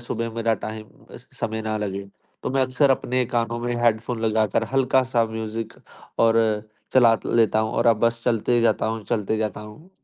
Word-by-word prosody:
सुबह 115 -1 -4
मेरा 115 -1 +1
टाइम 110 0 -6 0.5
समय 110 -1 -2
ना 110 0 -2
लगे। 100 -1 -4 0.4
तो - - -2
मैं 135 0 +2
अक्सर 130 +2 +2
अपने 130 -1 +1
कानों 115 0 0
में 120 0 -2
हेडफोन 115 0 +1
लगाकर 110 -1 +1
हल्का-सा 130 -2 +2
म्यूज़िक 110 0 -5 0.5
और 115 0 +4 0.5
चला 120 -3 +6
लेता 110 -2 +3
हूँ 110 0 -2
और 115 - +4
बस 115 0 0
चलते 120 0 +2
जाता 115 -2 +2
हूँ 110 -1 -3
चलते 110 -2 -1
जाता 110 -2 -3
हूँ। 105 - -13
115 Hz, 165 wpm, -23 LUFS, 110-120 Hz, 0.5 s, चला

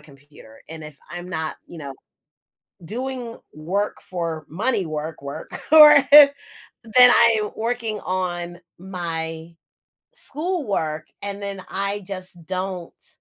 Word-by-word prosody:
computer. 145 -5 -18
And 160 -1 -9
if 150 -2 -11
I'm 175 +1 -7
not, 160 -3 -4
you 170 - -11
know, 140 -3 -7 0.9
doing 245 +3 -5 0.2
work 185 +7 -3
for 165 -4 -5
money 200 - -1
work 155 -1 -5
work, 140 0 -8 0.2
or 300 -1 +10
then 285 -1 +10 0.8
I'm 220 -2 +4
working 225 -2 -3
on 175 -2 -3 0.2
my 165 -3 -6 0.6
schoolwork 270 - -3 0.2
and 200 0 -6
then 195 -2 -5
I 200 +1 -3
just 185 -1 -7
don't 185 -2 -6
185 Hz, 115 wpm, -22 LUFS, 160-215 Hz, 0.9 s, or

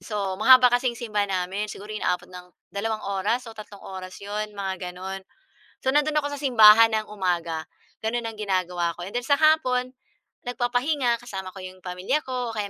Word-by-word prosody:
so 200 -3 -3
mahaba 255 -1 +8
kasing 245 0 +1
simbahan 210 -4 -1
namin 190 +3 -2
siguro 205 +2 -10
inaabot 180 -4 -1
ng 180 0 -10 0.3
dalawang 215 +2 -2
oras 200 +5 -1
o - - -13
tatlong 210 -2 -11
oras 185 -1 -8
'yon 210 +1 -4
mga 190 -1 -3 0.2
gano'n. 190 +1 -6 0.7
So - - +3
nando'n 300 +1 +2
ako 290 -1 -1
sa - - -8
simbahan 225 -4 +8
ng 215 - -3
umaga 170 -5 -1 0.4
gano'n, 235 +1 -1
ang 225 - -5
ginagawa 180 -4 -1
ko 175 - -6
and 200 - -10
then 245 - +1
sa 285 -1 +4
hapon 255 -5 +3 0.5
nagpapahinga 245 0 0
kasama 190 -6 -7
ko 195 - -10
yung 185 0 -9
pamilya 180 +11 -1
ko 250 -2 -3
o - - -10
kaya 205 -1 -2
210 Hz, 185 wpm, -25 LUFS, 190-245 Hz, 0.7 s, mahaba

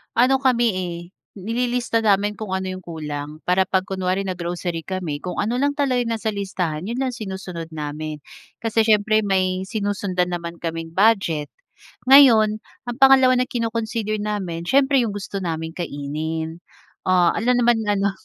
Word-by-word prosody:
Ano 260 +3 +4
kami, 250 -3 +3
eh, 180 -2 -4 0.4
nililista 235 +3 -1
namin 205 -1 +2
kung 210 -4 -5
ano 190 0 -3
yung 185 - -6
kulang. 150 -2 -6
Para 185 +1 +2
'pag 190 -1 +1
kunwari 190 0 -2
na-grocery 175 -2 -3
kami 180 -6 -3
kung 180 +2 -5
ano 235 +4 0
lang 285 +1 +1
talaga 270 -4 +1
yung 230 -1 -1
nasa 220 0 -2
listahan 185 -5 -3
'yon 235 +2 -3
lang 260 -1 0
sinusunod 190 -6 -6
namin. 150 0 -5 0.5
Kasi 225 0 +2
siyempre 215 0 +4
may 185 -2 0
sinusundan 200 -4 -1
naman 170 -1 -5
kaming 165 -1 -4
budget. 190 -8 +2 0.6
Ngayon 230 -6 +7 0.3
ang 240 - -5
pangalawa 265 -1 +6
na 250 - +2
kino-consider 225 -2 -2
namin 195 -5 -3
siyempre 270 +4 +3
yung 210 - -3
gusto 200 0 -5
naming 160 -1 -4
kainin. 160 +1 -4 0.5
Ah, 180 -2 +4
alangan 240 +4 +2
naman 240 -1 +3
ano. 200 -1 +1
195 Hz, 155 wpm, -22 LUFS, 170-230 Hz, 0.6 s, Ngayon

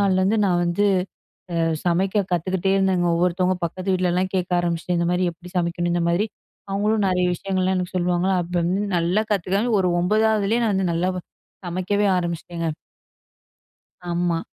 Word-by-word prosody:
நாள்லருந்து 195 +2 +2
நா - - +2
வந்து 175 +4 +1 0.7
அ 165 -1 +1 0.2
சமைக்க 190 +4 +1
கத்துக்கிட்டே 185 +2 0
இருந்தேங்க. 190 -2 +2
ஒவ்வொருத்தவங்க 180 +1 +1
பக்கத்து 185 +3 -2
வீட்லலாம் 185 0 0
கேட்க 180 -1 -1
ஆரம்பிச்சுட்டேன். 175 0 -1
"இந்த 170 - +1
மாரி 180 +1 +1
எப்படி 175 +2 -14
சமைக்கணும்?" 175 0 -1
இந்த 175 -1 +1
மாதிரி 185 +6 +1 0.4
அவங்களும் 210 +1 +1
நெறைய 180 -1 +1
விஷயங்கள்லாம் 185 +1 -1
எனக்கு 180 0 -4
சொல்லுவாங்க. 180 +1 +1
அப்பருந்து 175 +2 -1 0.2
நல்லா 175 +5 +1
கத்துக்கனேங்க, 200 +5 0
ஒரு 180 -1 +1
9வதுலேயே 215 +3 +2
நா 220 - +2
வந்து 190 -2 +1
நல்லா 180 +3 0
வ - - -3 0.5
சமைக்கவே 185 +4 0
ஆரம்பிச்சிட்டேங்க. 170 -1 -3 1.4
ஆமா. 170 -1 0
180 Hz, 145 wpm, -23 LUFS, 175-195 Hz, 1.4 s, நாள்லருந்து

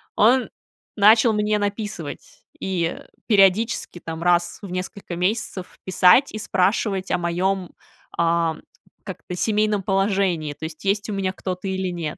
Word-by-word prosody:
Он 245 +4 +4 0.5
начал 220 +2 +5
мне 210 0 +1
написывать, 205 -6 -5 0.2
и 175 -3 -2 0.3
периодически 200 -2 +2
там, 165 0 -7
раз 175 -1 +2
в 195 -3 -8
несколько 185 0 -5
месяцев, 185 0 -2
писать 185 +8 +5
и 215 - -6
спрашивать 195 0 0
о - - +2
моём, 180 +2 -1 0.5
э, - - +4 0.8
как 190 -3 -7
это, 180 - -4
семейном 210 -2 +1
положении, 195 -6 0
то 160 - -8
есть 160 +2 -8
есть 205 +2 0
у - - -2
меня 195 -1 -1
кто-то 185 0 -5
или 190 -1 -2
нет. 170 -4 -4
190 Hz, 145 wpm, -22 LUFS, 180-210 Hz, 0.8 s, начал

